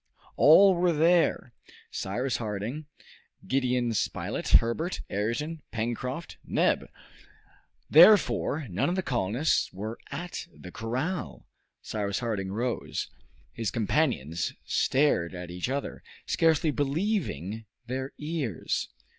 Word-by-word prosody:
All 190 +6 +7
were 175 -1 +2
there, 165 -5 +2 0.4
Cyrus 125 +7 -2
Harding, 110 +7 -4 0.6
Gideon 125 -2 +1
Spilett, - - -2
Herbert, 155 +10 +2
Ayrton, 130 +11 -2
Pencroft, 125 +7 -4
Neb. - - +1 1.0
Therefore 160 -4 +5
none 95 - 0
of 175 - 0
the 190 - -1
colonists 125 - 0
were 110 +4 -6
at 175 0 -6
the 90 - -12
corral. 120 - -3 0.4
Cyrus 100 -2 -2
Harding 105 -5 -2
rose. 120 +4 -3 0.4
His 115 -2 -2
companions 105 - 0
stared 130 - +1
at 90 -1 -7
each 90 +7 -3
other, 140 +1 -3 0.2
scarcely 160 -1 +2
believing 140 - -2 0.2
their 130 +2 -4
ears. 150 - -2
125 Hz, 105 wpm, -28 LUFS, 105-155 Hz, 1.0 s, All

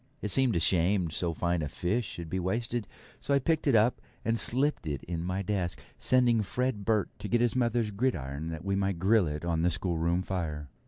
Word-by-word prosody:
It 105 - -2
seemed 125 0 +3
a - - +3
shame 90 +1 +2
so 85 +1 -1
fine 85 +1 0
a 75 - -2
fish 105 - -1
should 85 -1 -7
be 95 +4 -2
wasted, 115 +4 -1 0.3
so 140 - +1
I - - +6
picked 155 +3 0
it 135 - +4
up 110 +3 +3 0.2
and 115 0 +1
slipped 135 - 0
it 70 -4 -3
in 85 -1 -4
my 90 +2 -2
desk, 95 -3 -2 0.2
sending 125 -3 +4
Fred 120 +1 -1
Burt 110 -3 +1
to - - -5
get 120 +4 +2
his 120 0 +2
mother's 120 -3 +1
gridiron 80 - -2
that 80 +2 -6
we 100 0 +1
might 95 -2 0
grill 100 +1 +3
it 75 +2 -4
on 85 -1 0
the 85 - +3
schoolroom 85 0 0
fire. 75 -6 -3
95 Hz, 215 wpm, -29 LUFS, 85-115 Hz, 0.3 s, I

